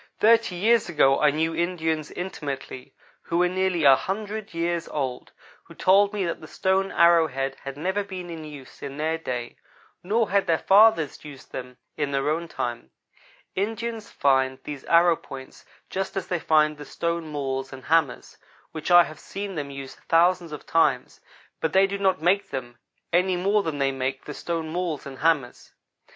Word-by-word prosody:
Thirty 225 -3 +4
years 220 +3 +3
ago 135 -4 +4
I 150 - +6
knew 160 +3 0
Indians, 160 -3 -1
intimately, 140 -7 -6 0.3
who 170 - -2
were 180 +1 +4
nearly 185 -2 0
a 135 -2 +8
hundred 210 +5 -4
years 170 0 -2
old, 130 -4 -4 0.3
who - - -15
told 200 +2 +4
me 205 -3 -2
that 170 - -3
the 155 - -10
stone 190 +3 0
arrow 170 -1 +5
head 135 -1 -3
had 140 0 -6
never 190 +6 -1
been 185 -3 -7
in 160 -1 -7
use 145 -4 -11
in 140 0 -6
their 160 +2 -1
day, 125 -6 -5 0.4
nor 215 +3 0
had 200 -1 +2
their 165 -1 +3
fathers 200 -6 +4
used 145 -3 -12
them 125 -1 -7 0.2
in 145 -2 -1
their 140 +1 0
own 165 +2 -2
time. 120 - -4 0.6
Indians 225 +2 -3
find 130 -1 +2
these 145 -3 -7
arrow 170 0 +5
points 135 -4 -11 0.2
just 195 0 -4
as 195 - -2
they 180 - -1
find 155 -1 +2
the - - -7
stone 170 -1 -3
mauls 135 -3 -3
and 130 -1 -10
hammers, 160 -5 0 0.3
which 155 +1 -5
I 175 0 +8
have 155 -2 -9
seen 200 0 -6
them 145 -4 -4
use 135 -1 -8
thousands 170 0 +2
of 150 - -8
times, 140 -6 +1 0.4
but 160 - -1
they 190 +1 +6
do 200 +1 -3
not 190 -2 +2
make 180 +5 +1
them 120 -3 -6 0.3
any 180 +1 +3
more 200 +4 +2
than 160 -6 -3
they 135 -1 +1
make 135 0 -3
the 150 - -6
stone 165 +1 -4
mauls 170 -3 -3
and 135 -1 -9
hammers. 150 -6 0
165 Hz, 180 wpm, -25 LUFS, 140-185 Hz, 0.6 s, a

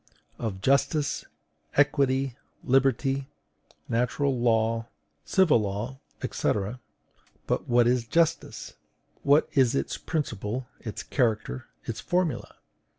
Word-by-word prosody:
Of 100 -5 -3
JUSTICE, 140 +4 +2 0.5
EQUITY, 135 -3 +3 0.3
LIBERTY, 135 +1 +2 0.6
NATURAL 125 +4 +1
LAW, 115 -1 +2 0.4
CIVIL 185 -10 +4
LAWS, 105 +6 -3 0.3
&c. - - +1 0.9
But - - -1
what 120 0 +5
is 120 -1 +2
justice? 165 +4 0 0.5
What 145 +2 +4
is 130 -4 +3
its 70 - -1
principle, 120 -5 -3 0.2
its 110 -2 -5
character, 110 - 0 0.2
its 110 -2 -4
formula? 175 -8 -1
125 Hz, 95 wpm, -27 LUFS, 115-140 Hz, 0.9 s, what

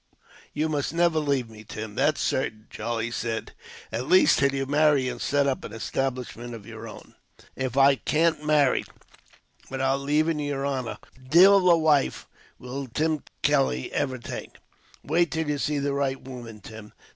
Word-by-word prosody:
"You 155 +2 -1
must 150 0 -2
never 170 -2 +3
leave 140 -5 0
me, 110 -1 -13
Tim, 110 0 -7
that's 145 +6 +1
certain," 110 -5 -1
Charlie 120 0 -3
said. 115 -1 -3 0.4
"At 120 +4 -3
least, 185 +3 +5
till 140 -1 +3
you 135 0 -2
marry 145 -1 +3
and 125 -1 -5
set 145 0 +1
up 135 -2 -1
an 105 - -8
establishment 120 0 -4
of 105 -3 -11
your - - -9
own." - - -12 0.4
"If 130 -1 -3
I 135 0 +6
can't 160 +1 +1
marry 150 -3 +3 0.9
without 135 0 0
leaving 150 +3 +1
yer 145 -2 -2
honor, 130 -4 -3 0.3
divil 185 +4 +7
a 170 - +6
wife 155 -3 +2 0.3
will 130 +2 -6
Tim 155 +4 -1 0.2
Kelly 65 0 +1
ever 130 -3 -1
take." 120 - -8 0.5
"Wait 170 +3 +2
till 160 0 -2
you 145 -1 -1
see 150 +1 0
the 140 0 -1
right 135 -1 -1
woman, 120 -5 -10
Tim. 110 +1 -11
135 Hz, 165 wpm, -26 LUFS, 125-150 Hz, 0.9 s, divil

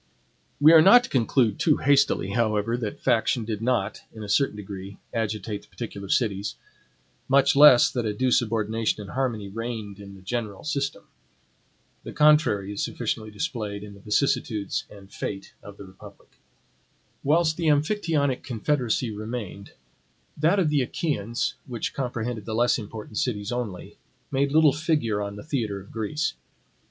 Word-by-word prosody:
We 155 +3 +7
are 160 - +9
not 240 +8 +8
to - - -8
conclude 120 -3 +2
too 155 -4 +3
hastily, 140 -8 +2
however, 110 0 +1
that 115 -4 -4
faction 115 0 +2
did 110 -1 -4
not, 125 +2 0
in 110 - -7
a 105 - -7
certain 135 +1 +2
degree, 100 -1 -8 0.2
agitate 110 -2 -3
the - - -21
particular 100 -5 -7
cities; 100 -4 0 0.7
much 140 +1 +4
less 140 -4 +8
that 120 -3 -2
a - - 0
due 125 +5 0
subordination 110 -1 0
and 100 - -9
harmony 120 -6 -2
reigned 110 -1 -6
in 100 -1 -10
the 95 - -15
general 105 -1 -4
system. 140 -8 -2 1.0
The - - -8
contrary 130 -10 +3
is 100 - -2
sufficiently 110 -1 -3
displayed 105 - -4
in 105 -1 -10
the 100 - -14
vicissitudes 105 -1 -1
and 100 -1 -15
fate 95 -1 -5
of 100 -1 -12
the 100 - -10
republic. 95 0 -15 0.9
Whilst 160 +2 +3
the 165 -1 -2
Amphictyonic 150 -3 +1
confederacy 125 -1 -1
remained, 105 -2 -6 0.6
that 160 +6 +2
of 180 -6 +2
the 145 -2 +3
Achaeans, 120 -4 -2
which 120 -3 -4
comprehended 120 -4 -3
the 110 - -3
less 120 +1 +2
important 105 0 -6
cities 105 -4 -2
only, 115 -7 -5 0.3
made 140 +1 +1
little 155 -2 +5
figure 150 -10 0
on 100 0 -4
the 105 - -9
theatre 115 -9 -2
of 100 - -14
Greece. 115 +8 -2
115 Hz, 155 wpm, -25 LUFS, 105-140 Hz, 1.0 s, are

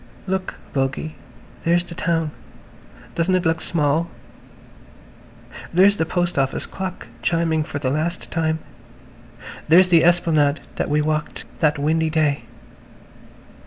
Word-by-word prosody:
"Look, 190 -1 -2 0.2
Bogey, 135 +3 -1 0.5
there's 170 +1 +3
the 175 - -10
town. 165 -2 0 0.8
Doesn't 170 +3 +1
it 180 -1 0
look 160 0 +1
small? 160 0 0 1.6
There's 195 +4 +5
the 160 - 0
post 175 -2 0
office 135 0 0
clock 190 -1 -6 0.2
chiming 160 +3 +1
for 145 - -5
the 130 -2 -1
last 160 +4 -2
time. 160 -1 0 1.1
There's 180 +4 +6
the 170 -2 +6
esplanade 160 -4 +3 0.2
where - - 0
we 150 +1 +1
walked 155 +1 -2
that 150 -2 +2
windy 160 +2 +1
day. 155 -3 +1
160 Hz, 125 wpm, -22 LUFS, 150-175 Hz, 1.6 s, There's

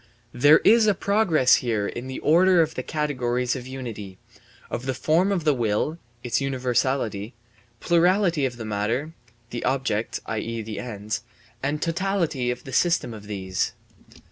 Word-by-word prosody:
* 115 - -37
There 150 +2 +8
is 225 0 +6
a 205 - +4
progress 175 - +3
here 110 -4 -1
in 120 +2 -6
the 130 - -5
order 180 +3 +5
of 160 0 -4
the - - -3
categories 125 -5 -1
of 125 -1 -7
unity 115 -8 -7 0.5
of 120 +2 -4
the 130 - -1
form 165 +9 +2
of 185 -5 0
the 150 -1 +3
will 120 +7 -1 0.2
(its 120 +2 0
universality), 125 -4 -1 0.4
plurality 175 -2 +3
of 120 -2 -8
the 115 - -6
matter 110 +9 -2 0.4
(the 120 - -4
objects, 130 -5 -1
i.e., 115 +1 -3
the 110 0 -6
ends), 110 -1 -4 0.4
and 145 +3 -1
totality 165 -7 -1
of 125 0 -3
the 135 - -9
system 170 -6 +2
of 105 -2 -10
these. 95 -3 -2
130 Hz, 160 wpm, -24 LUFS, 115-160 Hz, 0.5 s, There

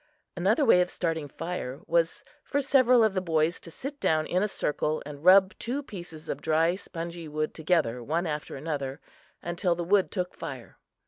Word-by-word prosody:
Another 200 - +2
way 180 -7 +6
of 180 - 0
starting 165 -5 -2
fire 150 -3 -5
was 170 +11 +1 0.2
for 285 - -1
several 255 -3 +5
of 220 -3 +3
the 185 - 0
boys 165 -1 +1
to - - -11
sit 275 - -7
down 155 -1 +2
in 180 +3 0
a 210 - +2
circle 155 -4 -1
and 145 0 -9
rub 190 +2 +7
two 265 +5 -3
pieces 175 - -10
of - - -4
dry, 160 +2 +2
spongy 170 -3 -7
wood 155 +1 -2
together, 155 -7 +1
one 165 +8 -1
after 150 -2 -4
another, 140 -1 -4 0.4
until 175 +1 0
the 175 - -3
wood 190 +2 +3
took 180 -2 -3
fire. 135 -7 -8
170 Hz, 185 wpm, -28 LUFS, 155-190 Hz, 0.4 s, rub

